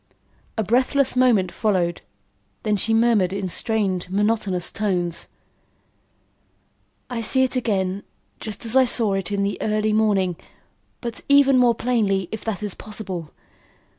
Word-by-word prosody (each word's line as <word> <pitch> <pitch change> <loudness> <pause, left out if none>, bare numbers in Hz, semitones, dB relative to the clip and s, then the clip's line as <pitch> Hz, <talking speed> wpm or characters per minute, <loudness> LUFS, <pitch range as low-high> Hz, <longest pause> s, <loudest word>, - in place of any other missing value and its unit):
A 220 - +1
breathless 255 +5 +2
moment 230 -8 +3
followed, 180 -4 0 0.6
then 210 -1 +1
she 215 +3 +1
murmured 225 -5 +3
in 195 -1 -3
strained 190 -2 -2
monotonous 200 -2 0
tones: 180 -5 -2 1.8
"I 240 -2 -4
see 260 +4 +3
it 260 0 -1
again 200 -5 -1 0.4
just 215 +1 -7
as 230 +2 -2
I 265 - +7
saw 230 -4 +1
it 195 -1 -2
in 200 -1 0
the 200 0 -2
early 215 0 0
morning 200 -5 +2 0.6
but 235 -2 -5
even 280 -1 +6
more 245 -2 +4
plainly, 210 -7 0
if 220 - -5
that 215 -2 -3
is 205 -3 -2
possible. 190 -7 -6
210 Hz, 135 wpm, -22 LUFS, 190-230 Hz, 1.8 s, I